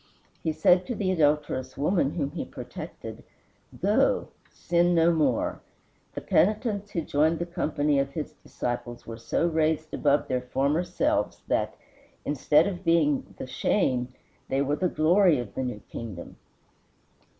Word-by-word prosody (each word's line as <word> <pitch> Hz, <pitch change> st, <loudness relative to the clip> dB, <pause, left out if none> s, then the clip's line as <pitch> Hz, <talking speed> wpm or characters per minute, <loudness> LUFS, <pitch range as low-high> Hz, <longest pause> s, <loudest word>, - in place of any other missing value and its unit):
He 160 Hz, -, 0 dB
said 175 Hz, +4 st, +3 dB
to 245 Hz, -, -2 dB
the 190 Hz, -3 st, 0 dB
adulterous 150 Hz, -6 st, +1 dB
woman 150 Hz, 0 st, +2 dB
whom 145 Hz, -4 st, -1 dB
he 165 Hz, -, -4 dB
protected, -, -, -8 dB, 0.6 s
"Go, -, -, +2 dB, 0.2 s
sin 175 Hz, 0 st, +1 dB
no 165 Hz, +1 st, +4 dB
more." 145 Hz, -7 st, 0 dB, 0.5 s
The -, -, -4 dB
penitents 210 Hz, 0 st, +1 dB
who 170 Hz, -, -2 dB
joined 155 Hz, +2 st, +2 dB
the 170 Hz, -, -2 dB
company 150 Hz, -4 st, 0 dB
of 135 Hz, 0 st, 0 dB
his 155 Hz, -3 st, -4 dB
disciples 120 Hz, 0 st, -5 dB
were 115 Hz, 0 st, -8 dB
so 140 Hz, +8 st, 0 dB
raised 155 Hz, -1 st, 0 dB
above 145 Hz, 0 st, +2 dB
their 125 Hz, -2 st, 0 dB
former 140 Hz, +6 st, 0 dB
selves, -, -, -1 dB
that, -, -, 0 dB, 0.5 s
instead 150 Hz, +2 st, +3 dB
of 190 Hz, -2 st, -4 dB
being 165 Hz, -5 st, +2 dB
the -, -, -5 dB
shame, 125 Hz, -1 st, 0 dB, 0.4 s
they 135 Hz, +1 st, +1 dB
were 145 Hz, +2 st, 0 dB
the 180 Hz, +1 st, +1 dB
glory 170 Hz, +1 st, +4 dB
of 120 Hz, -5 st, -5 dB
the -, -, -3 dB
new 125 Hz, -5 st, -4 dB
kingdom. 105 Hz, -7 st, -8 dB
155 Hz, 150 wpm, -27 LUFS, 135-175 Hz, 0.6 s, no